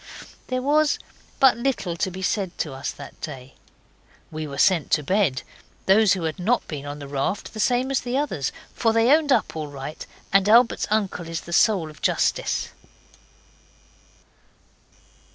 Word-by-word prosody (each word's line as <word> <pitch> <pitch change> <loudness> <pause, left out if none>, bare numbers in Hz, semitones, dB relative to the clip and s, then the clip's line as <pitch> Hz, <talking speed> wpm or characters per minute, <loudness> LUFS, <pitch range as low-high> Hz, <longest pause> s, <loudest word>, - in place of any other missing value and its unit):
There 255 0 -2
was 300 +1 +3 0.4
but 265 -4 +6
little 235 -9 -1 0.3
said 190 -2 -1
to 150 - -3
us 135 - -4
that 140 - -10
day. 135 -3 -8 0.8
We 155 -1 -5
were 140 -1 -7
sent 170 -3 +3
to 150 - +3
bed 175 -5 +1 0.4
those 200 +1 +5
who 185 -3 -3
had 160 +2 -3
not 225 +7 +1
been 145 -2 -6
on 145 +1 -5
the 145 -1 -8
raft 140 +8 -3
the 215 - -7
same 250 +4 +1
as 270 - +2
the 250 +1 -2
others, 195 - -1 0.2
for 225 -2 +1
they 230 +3 +4
owned 310 -2 0
up 235 -9 +2
all 155 -1 -4
right, 140 +1 -7 0.3
and 195 +1 +4
Albert's 235 +2 +4
uncle 200 -5 -1
is 165 -1 -3
the 170 - -8
soul 185 -6 +3
of 150 - -18
justice. - - 0
190 Hz, 160 wpm, -24 LUFS, 150-240 Hz, 0.8 s, but